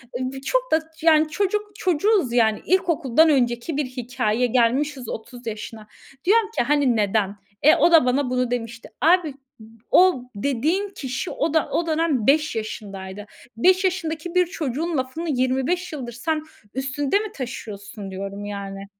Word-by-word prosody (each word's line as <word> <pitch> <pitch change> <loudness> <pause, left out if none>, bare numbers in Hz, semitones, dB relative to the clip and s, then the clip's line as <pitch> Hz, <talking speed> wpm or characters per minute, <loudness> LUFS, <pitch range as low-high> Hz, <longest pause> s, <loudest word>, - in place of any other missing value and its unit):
Eee, 245 - -2
b 265 - -7
çok - - -1
da 315 - +5 0.2
yani 315 -1 +4
çocuk 410 +4 -1
çocuğuz 365 - +1
yani. 220 -3 +3
İlkokuldan 325 -5 +3
önceki 245 +1 +1
bir 295 - 0
hikâye. 250 -2 -1
Gelmişiz 255 +2 +1
30 240 +2 -8
yaşına. 215 0 -7 0.4
Diyorum 425 +3 +4
ki, - - +3
hani 280 -2 +2
neden? 205 -1 +1 0.3
E, 310 +3 +6
o 345 - +4
da 325 -6 +7
bana 255 +1 +1
bunu 250 -1 0
demişti. 230 -1 -4
"Abi 340 0 +4
ı - - -8 0.6
o 360 -9 +5
dediğin 285 - 0
kişi, 270 -2 -5
o 320 - -1
da, 320 - +2
o 335 - 0
dönem 310 -8 +1
5 300 -1 +3
yaşındaydı. 205 -2 -6 0.3
5 370 +9 +4
yaşındaki 345 -2 -2
bir 360 0 +5
çocuğun 320 0 -3
lafını 265 +6 -3
25 265 +7 0
yıldır 250 -5 -6
sen 305 +6 -2 0.3
üstünde 270 +6 0
mi 430 -1 -5
taşıyorsun?" 210 -5 -7
diyorum 200 +2 -6
yani. 195 -1 -6
270 Hz, 155 wpm, -23 LUFS, 235-330 Hz, 0.6 s, da